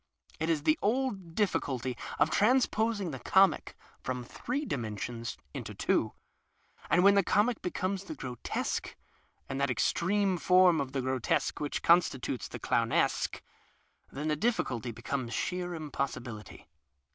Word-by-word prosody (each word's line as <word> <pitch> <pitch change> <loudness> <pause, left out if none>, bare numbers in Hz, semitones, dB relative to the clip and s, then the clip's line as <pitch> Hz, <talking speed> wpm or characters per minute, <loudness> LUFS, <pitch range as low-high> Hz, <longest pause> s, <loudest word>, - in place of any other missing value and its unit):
It 160 +1 -1
is 155 -3 +1
the 310 - +3
old 205 -7 -1
dilliculty 130 - 0 0.2
of 150 +2 +3
transposing 220 -4 +2
tiic 130 - -7
comic 190 0 +3 0.3
from 125 -1 -3
three 260 - -4
dimensions 115 - -4 0.2
into - - -6
two - - +1 0.4
— - - -24
and 175 +3 +4
when 200 +1 +7
the 200 - +5
comic 215 +5 +2
becomes 185 +2 -2
the 160 - -6
grotesque, 125 -4 -3 0.5
and 135 +1 -3
that 140 - +2
extreme 185 - +1
form 180 -2 +5
of 135 -2 -4
tiie 135 -2 -1
grotesque 130 -2 0
which 145 -1 -3
constitutes 135 - +2
the - - -7
clowncsque, - - +1 0.7
then 150 +3 -4
the 155 - +2
dilliculty 135 - -1
becomes 120 +1 -3
sheer 180 -1 -2
impossibility. 135 -7 -5
160 Hz, 135 wpm, -30 LUFS, 130-200 Hz, 0.7 s, when